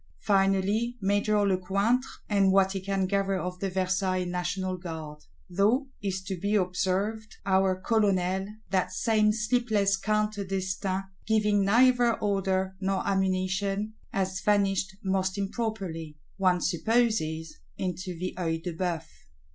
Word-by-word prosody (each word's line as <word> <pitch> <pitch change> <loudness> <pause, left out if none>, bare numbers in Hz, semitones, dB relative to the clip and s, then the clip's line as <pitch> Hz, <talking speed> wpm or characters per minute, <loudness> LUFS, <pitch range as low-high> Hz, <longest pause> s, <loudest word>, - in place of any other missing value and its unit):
Finally 200 +4 +2
Major 205 +1 +2
Lecointre, 200 +7 +1 0.2
and 200 -2 +3
what 190 0 +4
he 195 - -2
can 195 0 0
gather 195 0 0
of 180 0 -4
the 195 - -1
Versailles 185 0 0
National 180 +1 -2
Guard; 160 -4 -7 0.3
though, 215 +9 +2
it 200 - -3
is 190 0 -2
to 190 -2 -4
be 205 +3 0
observed, 195 +3 -1
our 190 -1 +2
Colonel, 190 -3 +1 0.2
that 190 -2 +1
same 215 -2 +2
sleepless 215 -3 +1
Count 215 +1 0
d'Estaing, 190 -1 -2 0.2
giving 210 -2 +3
neither 240 +2 +4
order 190 -2 0
nor 190 0 -1
ammunition, 195 +2 0 0.2
has 190 -1 -1
vanished 195 -2 +1
most 190 0 0
improperly; 195 -7 -3 0.2
one 185 -2 +2
supposes, 170 - 0 0.2
into 180 -1 -4
the 185 +2 -3
Œil 165 -2 -1
de 175 - -3
Bœuf. 170 -1 -2
195 Hz, 130 wpm, -28 LUFS, 185-210 Hz, 0.3 s, what